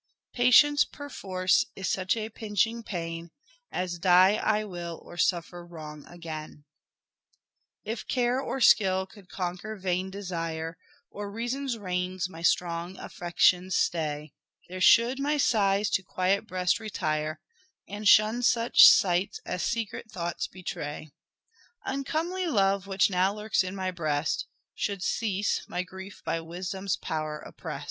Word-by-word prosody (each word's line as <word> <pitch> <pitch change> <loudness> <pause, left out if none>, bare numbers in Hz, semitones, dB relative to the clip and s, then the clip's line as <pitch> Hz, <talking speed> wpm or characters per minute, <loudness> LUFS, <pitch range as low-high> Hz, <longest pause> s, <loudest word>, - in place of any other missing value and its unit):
Patience 290 +4 +6
perforce 190 -9 0
is 190 - -4
such 190 +3 0
a 220 0 -3
pinching 220 +2 -1
pain, 170 -4 -5 0.4
As 175 -1 -3
die 185 +3 +5
I 215 0 +1
will 175 -4 -6
or - - -11
suffer 175 0 -1
wrong 155 -3 -10
again." 155 -3 -8 0.6
" - - -47
If 230 - -8
care 250 +1 +1
or 270 - -3
skill 190 -4 +5
could 190 -1 -17
conquer 185 +4 -4
vain 185 -1 -2
desire, 165 -4 -4 0.4
Or 205 0 -6
reason's 240 +3 -3
reins 180 -2 -2
my 165 -3 -11
strong 170 +1 0
affections 180 +1 +1
stay, 150 -2 -1 0.4
There 185 +1 -6
should 235 +7 +5
my 295 +2 +1
sighs 205 -6 +2
to - - +2
quiet 185 +1 0
breast 185 +2 0
retire, 155 -7 -2 0.5
And 205 +1 -4
shun 215 +4 +6
such 240 -1 +7
sights 180 0 +4
as 180 - -3
secret 225 -1 -3
thoughts 170 -1 -3
betray; 155 -4 -6 0.7
Uncomely 325 +7 -2
love, 195 - +1
which 195 +1 +2
now 185 +2 +2
lurks 210 -2 +1
in 185 +1 -5
my 185 -1 -2
breast 155 -3 -1 0.3
Should 200 -4 -3
cease, 205 -3 0
my 180 - -2
grief 190 +2 -11
by 165 - -1
wisdom's 185 +3 -4
power 155 -1 -3
oppress'd." - - -8
185 Hz, 135 wpm, -28 LUFS, 175-215 Hz, 0.7 s, such